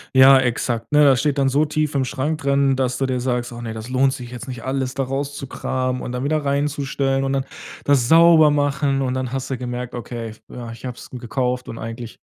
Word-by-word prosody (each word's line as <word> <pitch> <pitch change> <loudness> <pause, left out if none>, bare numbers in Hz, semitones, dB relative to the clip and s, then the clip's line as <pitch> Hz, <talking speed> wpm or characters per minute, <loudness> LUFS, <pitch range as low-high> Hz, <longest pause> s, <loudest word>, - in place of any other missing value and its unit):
Ja 135 0 +8
exakt, 120 -2 -1
ne, 150 0 +5
das 135 -2 +5
steht 145 0 0
dann 135 -1 +3
so 145 +4 +2
tief 155 0 -1
im 135 -2 +1
Schrank 145 +4 -2
drin, 140 -1 +2
dass 125 -1 -1
du 135 - 0
dir 130 -1 -1
sagst: 125 -1 -2
„Oh 120 - -8
ne, 115 -1 -5
das 110 +2 -7
lohnt 130 +1 +3
sich 125 -2 -8
jetzt 125 +1 -8
nicht 125 -3 -7
alles 130 0 -2
da 135 - 0
rauszukramen 135 -2 -3
und 125 - -5
dann 125 +1 -3
wieder 150 +1 0
reinzustellen 140 -1 0
und 135 0 -1
dann 135 0 -1 0.4
das 135 -4 +3
sauber 165 -2 +7
machen." 145 -1 +1
Und 130 -1 -1
dann 130 -1 -3
hast 135 0 -4
du 130 - -1
gemerkt: 125 0 -5
„Okay, 120 -1 -5
f 110 - -13
äh, 120 -2 -7
ich 115 +3 -11
hab's 125 - -9
gekauft 125 +1 -2
und 115 - -6
eigentlich 115 0 -7
130 Hz, 230 wpm, -21 LUFS, 125-140 Hz, 0.4 s, Ja